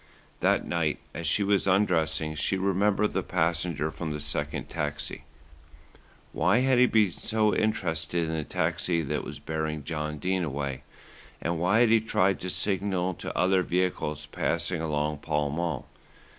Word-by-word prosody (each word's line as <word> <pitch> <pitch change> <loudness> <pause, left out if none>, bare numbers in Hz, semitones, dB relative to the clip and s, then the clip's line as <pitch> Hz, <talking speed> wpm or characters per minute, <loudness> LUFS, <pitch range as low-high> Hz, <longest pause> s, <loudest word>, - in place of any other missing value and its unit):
That - - +2
night 85 -3 0 0.2
as 85 - -4
she 100 +6 +3
was 100 -1 +2
undressing 80 -5 +2
she 85 +5 0
remembered 100 +2 +2
the - - 0
passenger 80 -2 0
from 80 0 -5
the 75 - -3
second 75 0 -3
taxi. 75 0 -4 1.1
Why 90 +9 +3
had 130 -1 +3
he 125 - +7
been 105 -5 +3
so 110 +3 +1
interested 80 -6 0
in 80 - -2
the 80 -1 -1
taxi 85 +3 0
that 75 +1 -2
was - - -7
bearing 80 -1 -3
John 75 0 -3
Dene 90 +4 0
away, 70 -3 -3 0.6
and 85 0 -2
why 95 +7 +3
had 120 - +5
he 115 0 +5
tried 95 -3 +2
to 90 - -4
signal 95 -1 0
to - - -6
other 95 0 +3
vehicles 90 -5 -1
passing 85 +3 -1
along 75 -1 -1
Pall 75 -1 -1
Mall? 80 -3 -2
85 Hz, 155 wpm, -28 LUFS, 75-95 Hz, 1.1 s, he